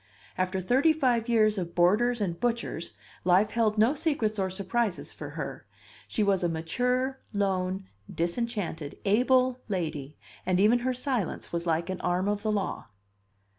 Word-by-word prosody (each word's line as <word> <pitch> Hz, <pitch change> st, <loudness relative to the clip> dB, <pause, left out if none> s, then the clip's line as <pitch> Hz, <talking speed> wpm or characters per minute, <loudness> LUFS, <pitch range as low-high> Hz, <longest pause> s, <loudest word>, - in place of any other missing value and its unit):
After 185 Hz, +1 st, 0 dB
thirty 265 Hz, -, +4 dB
five 245 Hz, -6 st, +1 dB
years 215 Hz, -3 st, +3 dB
of 170 Hz, -2 st, -5 dB
boarders 215 Hz, +8 st, +3 dB
and 175 Hz, -5 st, -2 dB
butchers, 235 Hz, -8 st, -2 dB, 0.3 s
life 185 Hz, +4 st, +4 dB
held 220 Hz, -2 st, +1 dB
no 225 Hz, +6 st, +5 dB
secrets 275 Hz, -9 st, -1 dB
or 190 Hz, -1 st, +1 dB
surprises 195 Hz, +2 st, -2 dB
for -, -, -7 dB
her; -, -, -5 dB, 0.4 s
she 215 Hz, -, 0 dB
was 195 Hz, -3 st, +2 dB
a 175 Hz, -, +2 dB
mature, 250 Hz, +11 st, -1 dB
lone, 190 Hz, -1 st, 0 dB, 0.3 s
disenchanted, 170 Hz, -4 st, -3 dB
able 255 Hz, +4 st, +3 dB
lady, 155 Hz, -7 st, -3 dB, 0.3 s
and 185 Hz, 0 st, +1 dB
even 220 Hz, +5 st, +5 dB
her 255 Hz, +1 st, 0 dB
silence 250 Hz, -, -2 dB
was 170 Hz, 0 st, -2 dB
like 165 Hz, +3 st, 0 dB
an 185 Hz, -, -5 dB
arm 180 Hz, +2 st, 0 dB
of 205 Hz, 0 st, 0 dB
the 215 Hz, 0 st, 0 dB
law. 205 Hz, -2 st, -2 dB
205 Hz, 155 wpm, -28 LUFS, 180-240 Hz, 0.4 s, no